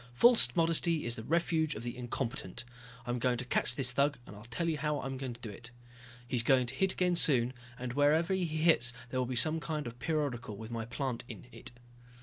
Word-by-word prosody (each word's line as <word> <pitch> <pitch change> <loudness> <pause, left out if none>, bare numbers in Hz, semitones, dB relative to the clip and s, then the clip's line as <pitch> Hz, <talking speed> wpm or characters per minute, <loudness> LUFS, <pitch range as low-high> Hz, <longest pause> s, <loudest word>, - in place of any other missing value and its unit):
"False 230 - +6
modesty 165 -1 +2
is 120 0 -1
the 110 - -6
refuge 160 +2 0
of 110 - -7
the 120 0 -5
incompetent. 120 -3 -5 0.4
I'm 120 0 -2
going 125 0 +1
to 130 - -5
catch 120 -1 0
this 125 -2 +3
thug 140 +2 +1
and 105 - -11
I'll 105 +2 -12
tell 120 +8 -3
you 160 -2 -1
how 150 0 -1
I'll 135 - -5
do 120 -4 -6
it. 115 +4 -10 0.6
He's 120 -1 0
going 125 +1 +3
to 120 - -2
hit 190 +7 +1
again 180 -1 +1
soon, 130 -7 +5 0.2
and 125 -1 -5
wherever 155 +6 +2
he 190 -2 0
hits 155 -6 +2 0.2
there 130 - -1
will 125 - -1
be 130 - -3
some 155 +6 +3
kind 155 -1 -4
of 120 - -6
a - - -24
periodical 130 -7 -3
with 110 +2 -9
my 115 -1 -4
plant 130 0 -4
in - - -10
it. - - -8
130 Hz, 220 wpm, -31 LUFS, 120-155 Hz, 0.6 s, False